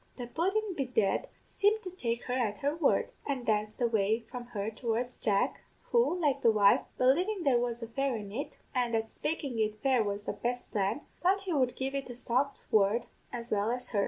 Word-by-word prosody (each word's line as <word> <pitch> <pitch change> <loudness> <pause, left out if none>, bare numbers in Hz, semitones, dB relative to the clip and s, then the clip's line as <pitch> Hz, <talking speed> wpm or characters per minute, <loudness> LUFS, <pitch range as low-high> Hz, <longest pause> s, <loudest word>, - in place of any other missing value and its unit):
"The 245 - -4
pudden, 380 - 0
bedad, 250 - +1 0.2
seemed 425 +2 +2
to 365 - -5
take 235 -10 -2
her 250 - -3
at 225 -5 0
her 285 +2 +1
word, 325 -4 +2 0.2
and 270 -4 -2
danced 215 -1 0
away 225 -2 +2
from 245 -1 -5
her 215 -3 -3
towards 235 +2 -2
Jack, 210 +5 +1 0.3
who, 470 -7 +3
like 280 -4 +1
the 230 - +5
wife, 205 -2 +5 0.2
believin' 355 +10 +2
there 265 -5 +4
was 240 -1 -2
a - - -4
fairy 260 -1 -1
in 200 -1 -9
it, 270 +8 -5 0.2
an' 245 -2 0
that 225 0 0
spakin' 290 -6 -3
it 215 -1 0
fair 260 -4 +4
was 205 0 -3
the - - -3
best 245 +1 -3
plan, 205 +6 0 0.2
thought 385 +3 +3
he 380 -3 -2
would 255 -4 +2
give 265 +1 -2
it 275 -2 -3
a 245 - -6
soft 255 +3 -1
word 215 +2 +4 0.3
as 240 -1 -6
well 210 +1 +2
as 250 +1 -3
her. 210 - +1
245 Hz, 210 wpm, -31 LUFS, 220-280 Hz, 0.3 s, the